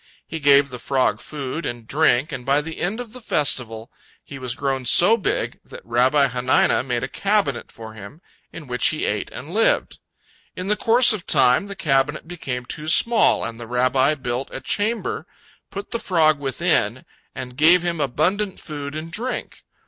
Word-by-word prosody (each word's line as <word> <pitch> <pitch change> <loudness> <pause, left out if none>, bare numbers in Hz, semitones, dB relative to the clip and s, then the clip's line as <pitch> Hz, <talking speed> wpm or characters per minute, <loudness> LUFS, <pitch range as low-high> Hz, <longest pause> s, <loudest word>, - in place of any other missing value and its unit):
He 160 - -6
gave 140 -1 +4
the 125 -2 -8
frog 130 -6 0
food 150 +2 -6
and 120 -1 -5
drink, 150 +2 +2
and 125 - -5
by 140 +3 +2
the 160 +1 -8
end 195 +6 -2
of 240 -2 -8
the 250 - -10
festival 120 - -1 0.3
he 140 - -9
was 125 -2 -4
grown 135 -2 -2
so 180 - +6
big 220 - -2
that - - -13
Rabbi 130 +4 +2
Hanina 125 +1 +2
made 125 -2 -2
a - - -2
cabinet 195 - -1
for 110 -1 -11
him, 105 +7 -11 0.3
in 165 - -10
which 125 -1 0
he 155 - 0
ate 105 0 -2
and 145 +8 -9
lived. 225 +2 +1 0.6
In 185 +2 -5
the 210 - +3
course 230 +3 +5
of 205 -5 -6
time, 130 +5 +4
the 200 - -6
cabinet 145 -1 0
became 135 -8 -5
too 150 +4 -7
small, 230 +7 +3
and 115 0 -7
the 120 - -8
Rabbi 130 +4 +2
built 125 -1 -4
a - - -5
chamber, 235 - -2 0.4
put 200 +3 -8
the 235 - -1
frog 155 -7 +2
within, 135 -3 0 0.3
and 125 -1 -7
gave 170 +5 +5
him 170 -3 -2
abundant 180 +9 -1
food 145 -2 -7
and 160 +2 -6
drink. 245 +8 -4
145 Hz, 180 wpm, -21 LUFS, 125-175 Hz, 0.6 s, so